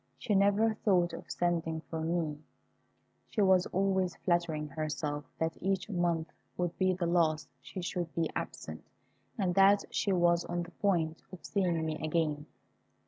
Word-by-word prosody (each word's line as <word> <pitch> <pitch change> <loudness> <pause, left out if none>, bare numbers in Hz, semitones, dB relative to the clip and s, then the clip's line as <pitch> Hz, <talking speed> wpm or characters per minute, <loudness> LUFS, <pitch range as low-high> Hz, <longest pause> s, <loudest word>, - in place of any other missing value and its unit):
She 205 - -1
never 205 +3 +4
thought 185 -5 +2
of - - -8
sending 165 -2 0
for 160 0 -5
me. 160 -2 -1 0.9
She - - -4
was 185 -2 +4
always 190 -1 +1
flattering 170 -4 0
herself 150 0 -3
that 160 0 -2
each 195 +2 -1
month 170 -3 0 0.3
would 175 -1 -1
be 185 -1 +4
the 180 -1 -2
last 165 -2 +2
she 185 - -7
should 175 -2 -3
be 165 -1 +1
absent, - - -5 0.5
and 190 -4 +1
that 195 +2 +6
she 200 - +1
was 175 -2 +3
on 175 0 -2
the 175 - -11
point 170 -5 0
of 185 - -10
seeing 175 -5 0
me 155 -1 -3
again. 155 -2 0
175 Hz, 155 wpm, -31 LUFS, 160-190 Hz, 0.9 s, that